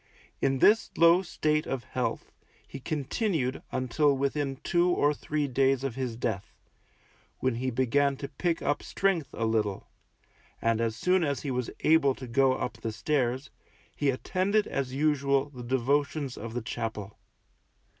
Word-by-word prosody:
In 135 -1 +2
this 215 - +4
low 170 +2 +6
slate 155 -4 0
of 130 -3 -3
health 125 - -3 0.4
he - - -8
continued 150 - -1
until 135 +3 +1
within 140 0 -1
two 175 0 +2
or 150 -4 +3
three 150 0 -2
days 135 0 +2
of 135 -3 -2
his 125 -2 -3
death, 110 -4 -3 0.8
when 130 -1 0
he 125 +3 -2
began 135 +3 +1
to 140 - -5
pick 165 +5 -2
up 145 +1 0
strength 175 -8 0
a 115 - -2
little; 105 -3 0 0.7
and 115 0 +1
as 115 -1 0
soon 180 +9 +2
as 140 -3 -1
he 140 - -3
was 125 -1 -2
able 155 -4 +4
to 130 - -8
go 130 +2 +3
up 125 - -4
the 115 - -3
stairs, 130 +3 -1 0.4
he 145 - +1
attended 190 +10 +1
as 135 -2 -3
usual 140 -1 +1
the 125 -3 -9
devotions 140 +3 0
of 115 +1 -7
the 125 - -2
chapel. 110 -3 -5
135 Hz, 155 wpm, -28 LUFS, 125-150 Hz, 0.8 s, low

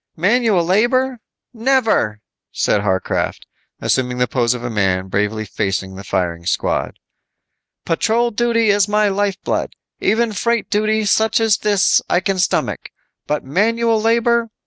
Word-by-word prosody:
"Manual 205 0 +2
labor? 240 +7 +1 0.3
Never," 225 - +1 0.3
said 105 - +1
Harcraft, 95 -2 -2 0.3
assuming 125 -1 0
the 125 0 +1
pose 120 -1 0
of 120 - -7
a 120 - -3
man 95 -3 0
bravely 105 +2 -1
facing 95 -1 -3
the 95 +1 -9
firing 90 -3 -2
squad. - - -1 0.9
"Patrol 230 +8 +1
duty 230 -1 +2
is 200 0 +2
my 210 0 +2
lifeblood. 200 0 -2 0.3
Even 230 0 +1
freight 235 +3 -1
duty 215 +1 +1
such 220 +2 +2
as 225 -2 +2
this 205 -3 +3
I 175 - +3
can 190 +1 -2
stomach. 180 - -1 0.4
But 150 0 -1
manual 225 - +1
labor! 230 +1 +2
205 Hz, 135 wpm, -18 LUFS, -, 0.9 s, this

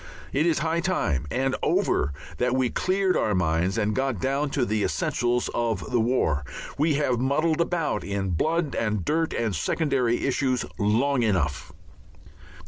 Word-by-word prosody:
It 150 +5 +2
is 165 - +2
high 165 +1 +1
time, 80 - 0
and 135 +1 0
over, 70 - +1 0.3
that 125 +1 +1
we 130 -2 +1
cleared 190 0 +1
our 105 - +1
minds 90 +3 +1
and 105 -1 +1
got 130 -5 -1
down 140 +5 0
to 135 -3 0
the 110 -2 0
essentials 120 0 0
of 115 -5 -2
the 120 - +2
war. 110 - +1 0.3
We 150 +1 +2
have 130 -5 +1
muddled 155 +5 +1
about 170 -2 -1
in 100 -1 -2
blood 155 - 0
and 105 -5 -1
dirt 165 +1 +1
and 110 -4 -1
secondary 135 -7 0
issues 130 -2 0
long 120 +6 +2
enough. 90 -11 0
125 Hz, 155 wpm, -25 LUFS, 105-150 Hz, 0.3 s, It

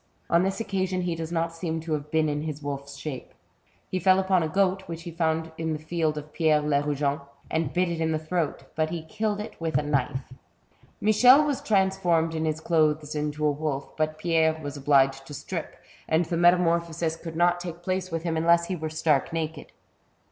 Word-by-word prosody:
On 170 - +5
this 195 +3 -1
occasion 190 -4 -1
he 175 -1 -1
does 165 0 -5
not 165 0 -1
seem 165 -1 -3
to 160 0 -3
have 150 0 -3
been 160 0 +2
in 150 0 -1
his 150 -1 -5
wolfs 140 0 -5
shape. 135 -2 -7 0.6
He 185 - 0
fell 185 +2 +5
upon 190 -1 +2
a 160 - 0
goat 190 +2 +2
which 165 0 -6
he 170 - -6
found 160 -1 -1
in 160 -1 -1
the - - -2
field 155 0 -1
of 150 0 -8
Pierre 155 -2 +3
Lerugen, 145 -1 0 0.3
and 160 -3 0
bit 180 +2 +1
it 170 -1 -3
in 160 0 +1
the 155 - +1
throat, 160 0 -2
but 155 0 +1
he 165 -1 -4
killed 215 +2 -2
it 210 - -6
with 160 -4 0
a 150 - +1
knife. 135 -3 -1 0.7
Michel 250 +8 +6
was 290 -3 -1
transformed 190 -5 +2
in 160 0 -1
his 155 0 -1
clothes 155 -2 +1
into 150 0 -2
a 150 - +4
wolf, 145 -2 -4
but 155 0 -1
Pierre 160 -1 +2
was 145 -2 -6
obliged 135 -1 +2
to 145 - -7
strip, - - -5 0.3
and 160 +2 +3
the 170 - -2
metamorphosis 170 -1 +2
could 165 0 -8
not 175 +1 +3
take 175 -1 -7
place 185 0 -2
with 165 -1 -3
him 165 -2 -1
unless 170 +1 +4
he 185 - -1
were 160 -2 -4
stark 155 -2 +1
naked. 160 -2 -4
160 Hz, 205 wpm, -26 LUFS, 150-175 Hz, 0.7 s, Michel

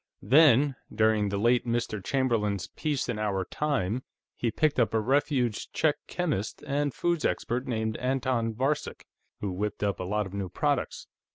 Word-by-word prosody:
Then, 140 +2 +5 0.2
during 110 -2 +2
the 100 - -1
late 120 +4 +3
Mr. 115 -4 -2
Chamberlain's 110 -7 0
'Peace 150 -3 -2
in 120 -4 -2
our 100 -3 -1
time,' 130 -7 -1 0.3
he 120 - -1
picked 150 +5 +1
up 115 -1 +2
a - - +4
refugee 125 -1 +1
Czech 155 -2 +2
chemist 150 - -2
and 145 0 0
foods 170 +3 -1
expert 125 +2 -1
named 110 -2 -1
Anton 125 -3 0
Varcek, 135 +5 -1 0.4
who 100 - -2
whipped 105 +3 -3
up 100 -1 0
a - - -2
lot 105 +3 -1
of 95 - -9
new 100 -2 -3
products. - - -1
120 Hz, 165 wpm, -28 LUFS, 105-135 Hz, 0.4 s, Then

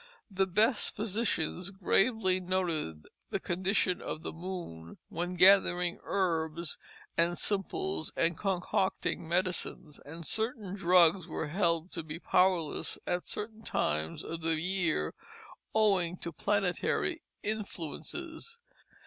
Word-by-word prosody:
The 190 0 +2
best 215 +6 +3
physicians 200 -5 0
gravely 195 0 +2
noted 170 - -1 0.2
the - - -1
condition 185 0 0
of 155 - -5
the - - -4
moon 165 - -7
when 175 +2 -3
gathering 180 -1 +5
herbs 165 -3 -1 0.4
and 170 +1 +2
simples 195 -4 0
and 165 0 +2
concocting 190 -2 -1
medicines; 175 -4 -1
and 165 +3 -8
certain 220 - -2
drugs 180 -2 +5
were 155 -2 -3
held 170 0 +1
to 170 - -4
be 155 0 -6
powerless 180 -3 +2
at 180 0 -1
certain 220 +1 -5
times 75 - -1
of 165 0 -5
the 160 -1 +1
year, 170 - 0 0.6
owing 190 -5 +3
to 170 - -5
planetary 205 - 0 0.2
influences. 220 - -5
180 Hz, 115 wpm, -31 LUFS, 165-195 Hz, 0.6 s, gathering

